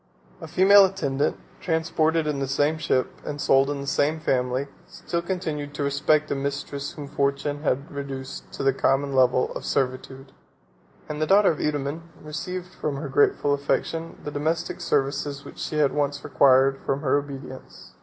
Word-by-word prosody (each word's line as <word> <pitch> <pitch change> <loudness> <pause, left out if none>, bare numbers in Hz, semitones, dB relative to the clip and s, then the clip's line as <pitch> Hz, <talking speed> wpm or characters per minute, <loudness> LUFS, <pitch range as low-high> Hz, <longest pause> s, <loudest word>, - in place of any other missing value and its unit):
A - - -7
female 200 +2 +7
attendant, 145 -7 -1 0.2
transported 160 -1 +1
in 150 -2 -1
the 135 - -1
same 145 +4 +1
ship, 130 -4 -1
and 145 0 -5
sold 135 -1 +4
in 145 -1 -3
the - - -5
same 145 +3 +1
family, 130 -3 0 0.2
still 170 - -4
continued 160 -5 -4
to 145 - -2
respect 150 +2 +1
a - - +1
mistress 140 0 -4
whom 145 -2 -8
fortune 140 0 -1
had 140 -1 -1
reduced 140 -1 -7
to - - -4
the 135 0 +3
common 135 +1 +1
level 130 -1 +3
of - - -6
servitude; 130 0 -2 0.8
and 150 0 -5
the 155 - +1
daughter 200 0 +5
of 155 - -5
Eudaemon 145 +1 -2 0.2
received 180 +4 -6
from 150 -5 -3
her 140 +1 -5
grateful 145 +1 +3
affection 160 +3 -2
the 150 - -5
domestic 160 +4 -2
services 140 +1 -1
which - - -11
she 155 - -3
had 145 -2 +3
once 145 -1 -1
required 135 0 +4
from 135 +1 -1
her 145 -1 +2
obedience. 135 -2 -10
145 Hz, 170 wpm, -25 LUFS, 135-155 Hz, 0.8 s, female